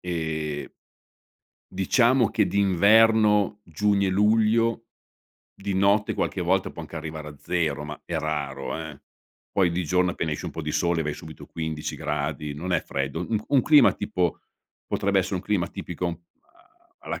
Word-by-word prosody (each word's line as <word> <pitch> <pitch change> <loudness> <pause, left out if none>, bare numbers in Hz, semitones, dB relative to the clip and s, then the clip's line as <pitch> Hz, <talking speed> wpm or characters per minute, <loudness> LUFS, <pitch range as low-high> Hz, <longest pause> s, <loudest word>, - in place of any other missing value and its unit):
e 80 -4 -3 0.9
diciamo 120 +5 +3
che 105 - +2
d'inverno, 105 +2 +4
giugno 100 +4 +1
e - - +1
luglio, 110 +3 +2 0.7
di 100 0 -4
notte 100 +2 +2
qualche 95 - -2
volta 95 +2 +1
può 85 - -8
anche 75 +1 -11
arrivare 80 -1 -6
a 75 - -11
0, 80 -5 -1
ma 75 - -8
è - - -3
raro, 70 -3 -3
eh. 75 -3 -8 0.5
Poi 95 -3 +2
di 90 +1 -1
giorno, 90 +3 +2
appena 80 - -3
esce - - -5
un - - -4
po' - - -5
di - - -3
sole, 85 -1 +1
vai 75 0 -3
subito 80 -1 -11
15 80 -2 -4
gradi. 75 0 -3
Non 90 +5 -4
è 85 - +3
freddo. 70 +4 -3
U 90 - -3
un 110 -1 -1
un 135 -3 +4
clima, 150 -1 +6
tipo, 90 -5 -2 0.5
potrebbe 100 -1 +1
essere 95 +1 -2
un - - -3
clima 100 -5 0
tipico 85 -1 -5 0.2
a - - -30
alla - - -5
90 Hz, 165 wpm, -25 LUFS, 80-105 Hz, 0.9 s, clima